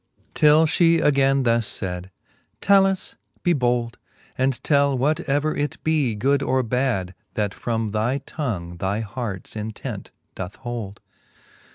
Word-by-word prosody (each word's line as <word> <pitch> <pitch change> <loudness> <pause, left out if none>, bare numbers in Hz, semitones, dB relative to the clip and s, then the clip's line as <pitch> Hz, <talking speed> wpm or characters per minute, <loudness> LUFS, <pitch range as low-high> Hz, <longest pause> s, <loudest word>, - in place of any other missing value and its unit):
X. - - -34
Till 150 +1 +5
fhe 165 +1 +4
againe 135 -1 +3
thus 115 -2 +1
fayd; 90 -1 -4 0.5
Talus 195 -1 +3 0.2
^ - - -49
be 175 - +3
bold, 120 -4 0 0.4
And 130 -1 0
tell 140 -2 +3
whatever 145 +2 +1
it 145 0 -2
be, 150 -8 +1
good 135 +6 +2
or 130 -1 +1
bad. 115 -6 -1 0.2
That 105 -2 -1
from 115 -3 -2
thy 110 +5 0
tongue 90 - -4
thy 100 +5 -1
hearts 110 -3 -5
intent 110 0 -6 0.2
doth 95 +1 -6
hold. 115 -6 -6
125 Hz, 140 wpm, -23 LUFS, 105-145 Hz, 0.5 s, Till